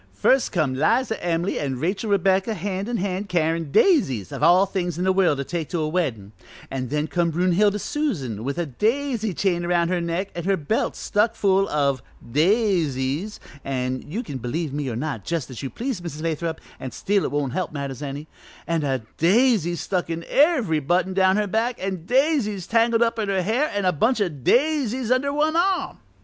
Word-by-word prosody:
"First 260 - +3
come 155 -8 0
'Liza 225 - +1
Em'ly 170 +1 0
an' 135 -3 -2
Rachel 190 - -1
Rebecca 195 +2 +2
hand 195 +3 -3
in 240 - -1
hand 195 +1 -3
carryin' 165 -3 0
daisies 135 - +3
of - - -6
all 180 +3 +6
things 180 -4 -3
in 180 - -1
the 190 0 +3
world 185 -6 +3
to 140 - -2
take 165 +1 -4
to 175 - -2
a 155 - 0
weddin' 130 - -2 0.4
an' 130 -1 -3
then 150 +3 -1
come 170 +1 0
Brunhilde 185 +5 +2
Susan, 150 - -2
with 140 +2 -3
a 175 - 0
daisy 225 - -1
chain 175 -1 0
around 175 -1 +1
her 180 -1 0
neck 170 +4 -2
an' 170 -1 -5
her 195 0 +2
belt 160 +9 -1
stuck 215 +2 0
full 195 0 +2
o' 140 -3 +1 0.3
daisies 165 - +1 0.2
an' 130 -1 -2
you 205 +12 -5
can 140 - -6
believe 135 +5 -3
me 145 -2 -2
or 115 - -4
not, 130 -4 -3
jus' 165 -6 -3
as 125 - -7
you 135 - -4
please, 240 - -4
Mrs. 160 -3 -6
Lathrop, 165 0 -2 0.2
an' 130 - -5
still 200 +8 0
it - - -1
won't 145 -3 -1
help 185 -1 -2
matters 140 -3 -5
any 145 +1 -5 0.4
an' 165 -1 0
a 135 -4 -1
daisy 190 - +3
stuck 180 0 -2
in 165 0 -4
every 270 - +3
button 175 +6 0
down 190 0 +3
her 210 - +1
back, 225 +4 0
an' 185 -3 -4
daisies 250 - +1
tangled 230 +2 +3
up 230 0 -1
in 210 -2 -1
her 190 -2 +1
hair, 245 - +1
an' 205 -1 -1
a 180 - +4
bunch 220 - +1
o' 200 -3 +1
daisies 250 - +1
under 265 +2 +2
one 305 +2 +1
arm. 365 +2 +1
180 Hz, 200 wpm, -23 LUFS, 150-215 Hz, 0.4 s, all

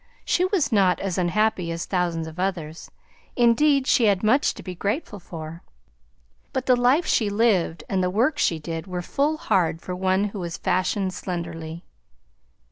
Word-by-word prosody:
She 360 - +2
was 370 -7 0
not 195 -4 +3
as 190 -2 -2
unhappy 185 0 +1
as 165 0 -4
thousands 175 -3 -1
of 160 +2 -9
others; 175 -4 -3 0.5
indeed, 260 +4 +4
she 255 -3 +3
had 200 -2 +2
much 255 +7 +3
to - - -10
be 185 - -6
grateful 205 - -3
for, 165 -1 -8 0.9
but 260 - -2
the 255 - +5
life 250 +8 +3
she 215 -3 +2
lived 200 -7 +1
and 190 -1 0
the 180 - +1
work 250 +10 +1
she 165 - +2
did 165 +2 -6
were 180 -1 -4
full 295 - 0
hard 170 - +1
for 180 +1 -6
one 190 +1 +1
who 205 - -5
was 170 -2 -4
fashioned 185 +1 0
slenderly. 170 -2 -5
190 Hz, 170 wpm, -24 LUFS, 170-230 Hz, 0.9 s, the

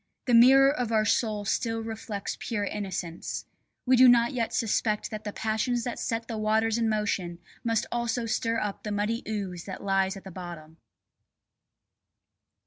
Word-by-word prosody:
The 245 - +1
mirror 270 +4 +7
of 245 -6 -2
our 215 -1 +3
soul 210 -1 0
still 225 +2 -1
reflects 220 -2 -5
pure 220 -4 -2
innocence; 185 -5 -4 0.4
we 255 0 +5
do 255 0 +8
not 235 +1 +4
yet 235 -3 -1
suspect 215 -1 0
that 215 0 -6
the 210 - -3
passions 225 +3 -1
that 245 - -4
set 225 0 -2
the 225 -2 -4
waters 220 +1 +1
in 225 -1 +1
motion 200 -5 -1 0.3
must 230 -2 +1
also 235 0 -1
stir 230 0 0
up 205 -3 -3
the 210 - -5
muddy 210 +3 -1
ooze 195 -5 -4
that 190 - -7
lies 195 0 +1
at 195 - -11
the 190 - -9
bottom. 170 -3 -9
220 Hz, 165 wpm, -27 LUFS, 200-230 Hz, 0.4 s, do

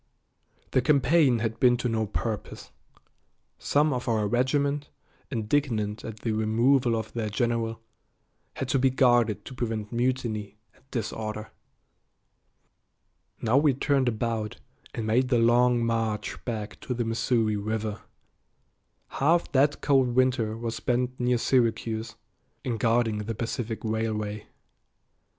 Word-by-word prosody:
The 130 - +3
campaign 140 -1 +4
had 115 0 -3
been 125 -1 +5
to 125 - -1
no 110 -2 0
purpose. 110 0 -4 0.9
Some 150 +1 +2
of 125 -1 -4
our 110 -3 +1
regiment, 140 +5 0 0.4
indignant 110 -3 -1
at 110 -1 -8
the 115 - -1
removal 115 +3 +2
of 110 -1 -4
their 110 -3 -2
general, 115 +1 -1 0.8
had 135 - -3
to 135 - +2
be 135 +1 +4
guarded 120 -4 +3
to - - -8
prevent 110 -4 -3
mutiny 115 -4 -2 0.2
and - - -27
disorder. 110 -2 -4 1.9
Now 115 +3 +3
we 145 -2 +4
turned 135 -2 +2
about 110 -2 -2 0.4
and 115 - -3
made 120 +4 +2
the 125 -2 +2
long 120 +1 +4
march 115 -2 -2
back 110 -3 -4
to 125 - -4
the 120 -1 -1
Missouri 115 -1 +1
River. 105 0 -3 1.1
Half 165 +5 +1
that 145 +2 +2
cold 130 -4 +3
winter 125 -4 +2
was 115 -1 -4
spent 125 +1 -1
near 125 0 +2
Syracuse, 115 -3 0 0.5
in 120 -3 -2
guarding 115 -1 +1
the 110 +2 -4
Pacific 115 0 -4
Railway. 110 -1 -2
115 Hz, 130 wpm, -27 LUFS, 110-125 Hz, 1.9 s, been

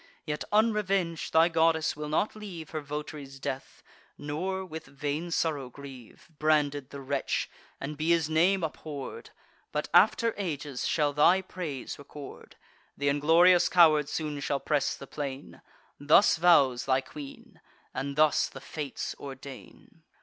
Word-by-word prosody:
Yet 150 -1 -3
unreveng'd 200 -6 +1
thy 160 +1 +5
goddess 165 -1 +2
will 150 0 -5
not 160 +9 0
leave 185 -7 -8
Her 155 -1 -3
vot'ry's 145 -1 -7
death, 135 0 -6 0.3
nor; 185 +6 -3
with 160 -4 -8
vain 145 +4 -4
sorrow 150 -6 -1
grieve. 135 -3 -12
Branded 145 -3 +1
the 140 - -8
wretch, 135 0 -2 0.3
and 150 +2 -5
be 155 +2 -2
his 165 -2 +3
name 175 +4 +2
abhorr'd; 155 - -6 0.4
But - - -2
after 230 -2 +5
ages 150 -8 -3
shall 150 -2 +1
thy 175 +6 +4
praise 160 -10 -6
record. 145 0 -11 0.4
Th' - - -7
inglorious 165 +5 +5
coward 155 -4 +5
soon 150 -2 -3
shall 140 0 -1
press 150 +1 0
the - - -10
plain: 140 -1 -7 0.4
Thus 150 +8 +5
vows 145 -8 +4
thy 130 0 +2
queen, 140 +1 -11 0.3
and 140 +2 -4
thus 155 0 +3
the 135 - -10
Fates 145 +1 -5
ordain." 135 +3 -11
150 Hz, 140 wpm, -28 LUFS, 140-165 Hz, 0.4 s, thy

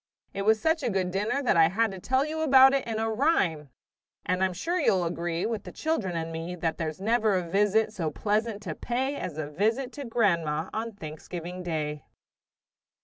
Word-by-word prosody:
It 200 - -3
was 220 0 +4
such 320 +7 +1
a 250 - 0
good 190 -3 -1
dinner 210 +9 -1
that 245 - +3
I 165 -1 +6
had 220 +5 +1
to 190 - -7
tell 260 +8 +1
you 315 +1 -3
about 270 -3 +7
it 275 -3 0
in 225 -1 -2
rhyme! 220 - +1 0.6
And 185 +1 +1
I'm 190 - +2
sure 335 - -2
you'll 185 - +3
agree, 170 0 -2
With 225 -3 -2
the - - -9
children 230 - -2
and 165 0 -3
me, 165 +2 -5
That 165 -2 -2
there's 155 -1 -3
never 220 0 +2
a 180 -2 -1
visit 210 +4 +2
so 170 -7 -2
pleasant 210 +4 -1
to - - -4
pay 260 +4 -2
As 170 - -5
a 155 -2 -3
visit 225 - 0
to 285 - -6
grandma 170 -9 0
on 225 +1 -3
Thanksgiving 175 +1 -7
Day. 155 -4 -3
200 Hz, 200 wpm, -27 LUFS, 170-235 Hz, 0.6 s, about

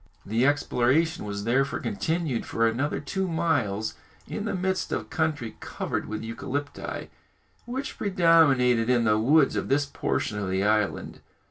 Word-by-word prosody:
The 115 +6 +2
exploration 145 +1 +1
was 100 0 -4
therefore 135 +5 +1
continued 165 - -1
for 115 0 +1
another 130 +6 -1
two 190 +6 -2
miles 140 - 0 0.3
in 210 - -4
the 210 -3 -1
midst 190 +1 -1
of - - -3
country 155 -8 -1
covered - - -4
with 110 +1 -4
eucalypti, 140 +5 -5 0.6
which 260 +2 -5
predominated 150 - +4
in 120 -2 +3
the 110 -1 +3
woods 140 +5 +4
of - - -2
this 145 +1 +2
portion 110 -5 -2
of 100 -2 -3
the 95 +1 0
island. 105 -1 0
135 Hz, 145 wpm, -26 LUFS, 115-165 Hz, 0.6 s, predominated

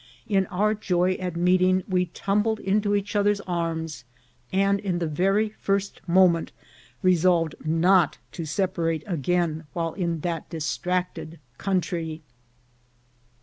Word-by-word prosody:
In 195 -2 +2
our 205 +3 +1
joy 180 -3 +1
at 180 -2 -4
meeting 185 +1 +3
we 180 -1 +1
tumbled 210 +5 0
into 205 +1 +1
each 205 +1 -2
other's 205 0 +3
arms, 165 -6 -3 0.5
and 195 +1 +2
in 190 -4 -2
the 170 - -1
very 195 +7 +1
first 195 0 -1
moment 175 -1 +4 0.5
resolved 175 -3 +3
not 165 +2 +3
to 170 - -5
separate 165 -1 -1
again 170 -2 -1
while 165 -2 -2
in 170 -4 -2
that 170 -1 -3
distracted 170 +1 -3 0.2
country. 165 -4 -2
180 Hz, 120 wpm, -25 LUFS, 165-195 Hz, 0.5 s, moment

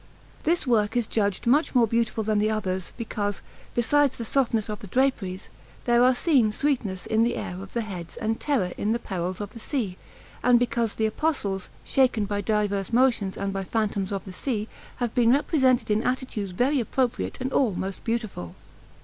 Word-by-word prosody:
This 335 +1 +2
work 225 -2 +2
is 240 - +2
judged 205 -3 0
much 275 +5 +3
more 240 -2 +6
beautiful 225 0 0
than 215 0 +1
the 215 +1 +2
others, 190 -4 -2
because, 205 -3 -3 0.3
besides 275 +3 +3
the 230 - -4
softness 230 -4 +1
of 210 -1 -4
the 205 - -9
draperies, 200 -5 0 0.4
there 240 0 +4
are 255 0 +5
seen 250 -7 +3
sweetness 215 -8 -1
in 220 +1 +2
the 240 - +1
air 180 - -4
of 195 - -10
the 235 - 0
heads 180 -5 -7
and 225 -1 -1
terror 250 -12 0
in 215 +2 +1
the - - +1
perils 185 -4 -4
of 205 -1 -5
the 230 - -9
sea, 220 -8 -2 0.4
and 250 -1 +5
because 235 -2 0
the 220 - +1
Apostles, 215 - -1
shaken 250 -6 +2
by 205 0 -2
diverse 205 -1 0
motions 235 -6 +2
and 200 0 -2
by 195 0 -2
phantoms 205 -2 -1
of 195 -1 -3
the 190 - -8
sea, 215 0 -2 0.3
have 240 -3 -2
been 240 -1 +4
represented 260 -5 +2
in 210 +1 +3
attitudes 250 -6 -2
very 255 +10 +1
appropriate 245 +1 -1
and 260 +1 -3
all 230 -9 +2
most 190 +1 -4
beautiful. 220 - -3
220 Hz, 190 wpm, -26 LUFS, 200-250 Hz, 0.4 s, more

